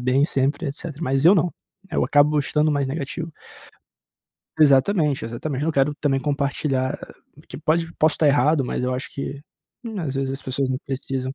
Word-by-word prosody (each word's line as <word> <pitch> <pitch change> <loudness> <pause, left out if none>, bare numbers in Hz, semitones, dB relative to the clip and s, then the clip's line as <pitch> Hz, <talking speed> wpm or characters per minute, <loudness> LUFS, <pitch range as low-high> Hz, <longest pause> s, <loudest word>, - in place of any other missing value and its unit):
bem 130 +3 +2
sempre, 140 +3 0
etcétera. 145 +2 -4
Mas 135 -1 0
eu 180 - +8
não, 175 -1 +1 0.4
eu - - +2
acabo 145 +1 +4
estando 150 +2 +1
mais 140 -2 0
negativo. 160 +3 -4 1.3
Exatamente, 150 +1 +4
exatamente. 130 +5 -4
Eu - - 0
não 165 - +1
quero 140 +1 +2
também 140 -2 +1
compartilhar, 140 -1 -1 0.5
que - - -9
pode 165 +2 0
posso 155 0 +4
estar 155 - +2
errado, 145 +1 +3
mas 125 - -3
eu 125 - 0
acho 130 - -5
que, 140 +1 -5 0.4
hum, 220 -4 -5
às 145 -5 -3
vezes 135 0 -1
as 135 - -4
pessoas 130 0 -1
não 130 - -1
precisam 130 0 -3
140 Hz, 180 wpm, -23 LUFS, 135-155 Hz, 1.3 s, eu